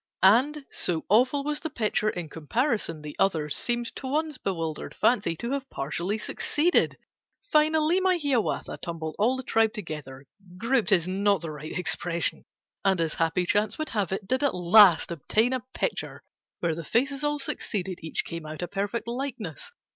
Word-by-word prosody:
And, 270 +9 +4
so 165 -3 -1
awful 255 +7 +3
was 300 +1 0
the 320 - -4
picture, 215 -4 0
In 175 -5 -4
comparison 165 - -1
the 150 -1 -7
others 155 -6 +2
Seemed, 240 -1 0
to 265 - -5
one's 300 +1 -1
bewildered 165 -5 -3
fancy, 200 -8 +2
To 235 +9 -5
have 275 -1 -3
partially 170 +9 -2
succeeded. 310 +9 +1 0.5
Finally 310 +3 +3
my 375 -1 +2
Hiawatha 280 -8 -1
Tumbled 160 -2 -5
all 235 +5 +3
the 260 - -5
tribe 225 -2 +2
together, 150 - -7 0.3
('Grouped' 230 +2 +1
is 175 -3 +4
not 200 +1 +1
the 165 -2 -5
right 150 0 -6
expression), 175 -1 0 0.4
And, 190 -2 +2
as 165 -2 0
happy 165 +2 +1
chance 205 +3 +1
would 310 - -3
have 205 -5 -1
it 190 0 -3
Did 260 +2 +1
at 285 - +2
last 180 0 +6
obtain 220 - +1
a 260 - 0 0.2
picture - - -3 0.4
Where 170 -2 +1
the 165 +1 -6
faces 270 - 0
all 295 0 +1
succeeded: 190 -9 -3
Each 160 - -1
came 165 -2 -6
out 155 +3 -6
a - - -2
perfect 205 +5 -3
likeness. 235 - -4
210 Hz, 170 wpm, -27 LUFS, 170-260 Hz, 0.5 s, last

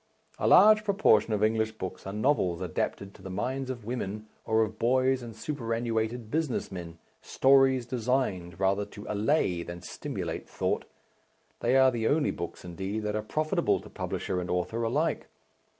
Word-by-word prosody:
A - - +1
large 215 0 +7
proportion 200 - +3
of 105 -1 +1
English 110 0 +1
books 95 -3 -7
are - - -3
novels 105 -6 +1
adapted 95 +2 -3
to - - -16
the 95 - -8
minds 130 +8 -3
of 120 -4 -5
women, 110 -3 -4 0.2
or 110 0 +3
of 110 0 -5
boys 130 +2 +2
and 115 -2 -8
superannuated 115 -3 -2
business 155 -9 -1
men, 85 -3 -7 0.2
stories 135 -2 +4
designed 115 -8 -1
rather 100 +1 +2
to 105 0 -10
allay 105 - +1
than 85 0 -8
stimulate - - -5
thought - - -1 0.7
they 125 +3 +3
are 130 0 +6
the 115 -2 -1
only 150 0 +2
books, 85 +1 -7
indeed, 95 +5 -4
that 105 0 -2
are 110 - 0
profitable 155 +8 0
to - - -13
publisher 90 - -3
and 90 - -6
author 90 +6 -1
alike. 145 +8 0
110 Hz, 165 wpm, -28 LUFS, 95-130 Hz, 0.7 s, large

